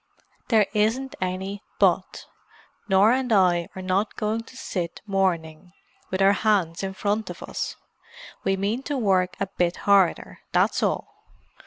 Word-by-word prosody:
"There 220 -3 +4
isn't 230 +5 +1
any 190 +2 -3 0.2
'but.' - - +1 0.6
Norah 205 +6 +5
and 255 -2 -3
I 180 -4 +3
are 190 - -6
not 190 +3 0
going 215 +1 -1
to 255 - -14
sit 175 -8 -4
mourning, 180 -3 -1 0.4
with 190 +1 0
our 195 +1 +6
hands 195 -6 +1
in 190 0 -4
front 210 +2 -1
of - - -8
us. - - -4 0.7
We 195 0 +1
mean 205 +6 -1
to 290 - 0
work 185 -5 +1
a 195 - 0
bit 175 -2 -1
harder, 200 -3 +3
that's - - +2
all. - - 0
195 Hz, 150 wpm, -24 LUFS, 185-215 Hz, 0.7 s, our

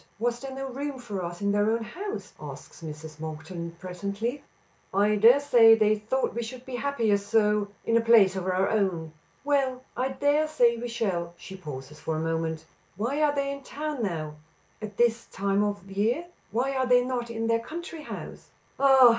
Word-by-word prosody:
Was 240 +2 0
there 270 +1 -6
no 270 0 -4
room 275 +2 -4
for 210 -7 -5
us 175 +2 -5
in 200 - +2
their 205 +1 +3
own 230 +1 +1
house?" 400 - -6
asks - - -10
Mrs. 155 -1 -8
Monkton 160 +2 -6
presently. 200 +8 -4 0.5
"I 205 +2 +3
dare 230 +6 +7
say 235 -6 +7
they 215 -1 +4
thought 220 +5 -1
we 235 - -2
should 245 +2 -7
be 255 -2 -4
happier, 235 -7 +1
so 210 0 +2 0.2
in 230 - +2
a 230 - +5
place 225 -5 +6
of 190 -1 -3
our 185 +1 +2
own." 180 -7 0 0.3
"Well, 270 -3 +1
I 255 - 0
dare 285 +3 +2
say 245 -6 +4
we 235 +1 -4
shall." 190 -8 -2
She 190 - -9
pauses 150 -4 -8
for 160 - -2
a - - -1
moment. 160 -1 -2 0.3
"Why 255 +8 -1
are 295 -1 +3
they 280 0 0
in 280 0 -6
town 295 0 -4
now 155 -7 -3 0.4
at 210 -2 -7
this 235 -1 +2
time 200 +1 0
of 205 -2 -2
year? 225 - +1 0.2
Why 255 +5 0
are 260 -1 +1
they 245 0 +5
not 245 -2 -2
in 225 -1 -3
their 230 0 +2
country 330 +6 -7
house?" - - -8 0.3
"Ah! 265 -2 +8
225 Hz, 190 wpm, -27 LUFS, 190-260 Hz, 0.5 s, Ah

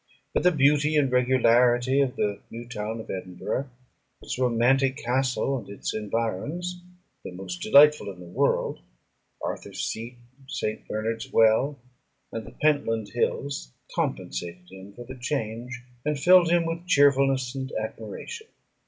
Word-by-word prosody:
But - - +2
the 180 - +5
beauty 150 0 +3
and 135 -3 +2
regularity 125 +1 +4
of 130 -2 0
the 100 -1 -1
new 120 +1 -8
town 110 -1 -4
of 110 - -7
Edinburgh, 95 +8 -4 0.5
its - - -4
romantic 130 +2 +3
castle, 130 +2 0
and 105 - -12
its 100 - -4
environs, 115 - -3 0.4
the - - -6
most 90 -1 -7
delightful 145 -2 +6
in 90 - -13
the 90 - -10
world, 85 +1 0 0.6
Arthur's - - -4
Seat, 115 +3 -5 0.3
St. 110 -6 -4
Bernard's 115 +4 -3
Well, 115 +6 +4 0.5
and 115 -1 -6
the - - -12
Pentland 115 -8 +1
Hills, 120 - -2 0.2
compensated 90 +1 -3
him 95 +1 -11
for 120 - -8
the 130 - -8
change, 125 -1 -3 0.2
and 150 -1 -1
filled 175 +2 +6
him 170 0 +3
with 165 +2 -4
cheerfulness 135 -4 +4
and 135 0 -5
admiration. 110 - -7
125 Hz, 140 wpm, -26 LUFS, 110-140 Hz, 0.6 s, delightful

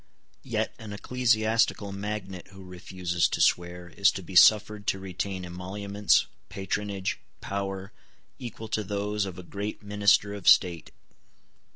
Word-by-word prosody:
Yet - - -2
an 110 -2 -8
ecclesiastical 110 -2 +1
magnate 100 -2 -5
who 95 0 -13
refuses 90 -1 -1
to - - -3
swear 85 0 +1
is 100 +2 +3
to 95 - -6
be 90 +2 -10
suffered 105 +1 +5
to - - +1
retain 95 0 -4
emoluments, 100 +3 0 0.2
patronage, 100 0 -3 0.2
power, 95 0 -4 0.5
equal 115 -3 -7
to 110 - -1
those 105 +1 -2
of 95 -3 -7
a 90 - -8
great 100 +4 -5
minister 105 0 +3
of 100 -3 -7
state. 85 -3 +4
100 Hz, 135 wpm, -27 LUFS, 95-105 Hz, 0.5 s, suffered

